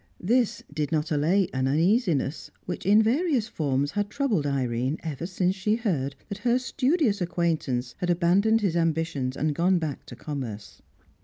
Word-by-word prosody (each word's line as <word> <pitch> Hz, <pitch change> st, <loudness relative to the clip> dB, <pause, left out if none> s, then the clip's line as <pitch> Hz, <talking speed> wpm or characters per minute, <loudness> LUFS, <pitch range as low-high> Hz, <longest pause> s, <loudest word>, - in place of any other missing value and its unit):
This 235 Hz, +4 st, +1 dB
did 150 Hz, -1 st, -2 dB
not 155 Hz, 0 st, 0 dB
allay 165 Hz, +6 st, +2 dB
an 130 Hz, 0 st, 0 dB
uneasiness 165 Hz, -, +1 dB, 0.2 s
which, 180 Hz, 0 st, -5 dB
in 210 Hz, +2 st, +6 dB
various 260 Hz, 0 st, +1 dB
forms, 145 Hz, -, -1 dB
had 205 Hz, 0 st, -1 dB
troubled 215 Hz, -, 0 dB
Irene 130 Hz, +1 st, -1 dB
ever 160 Hz, +1 st, -4 dB
since 185 Hz, 0 st, 0 dB
she 210 Hz, +3 st, +1 dB
heard 155 Hz, -, -1 dB
that 200 Hz, -, -6 dB
her 240 Hz, +2 st, +2 dB
studious 255 Hz, -, +1 dB
acquaintance 155 Hz, -8 st, -1 dB
had 180 Hz, -, -2 dB
abandoned 190 Hz, +6 st, +3 dB
his 190 Hz, -5 st, 0 dB
ambitions 160 Hz, -5 st, 0 dB
and 155 Hz, 0 st, 0 dB
gone 180 Hz, +4 st, +2 dB
back 155 Hz, -5 st, -4 dB
to 120 Hz, -, -9 dB
commerce. 125 Hz, -7 st, -6 dB
170 Hz, 160 wpm, -26 LUFS, 145-205 Hz, 0.2 s, in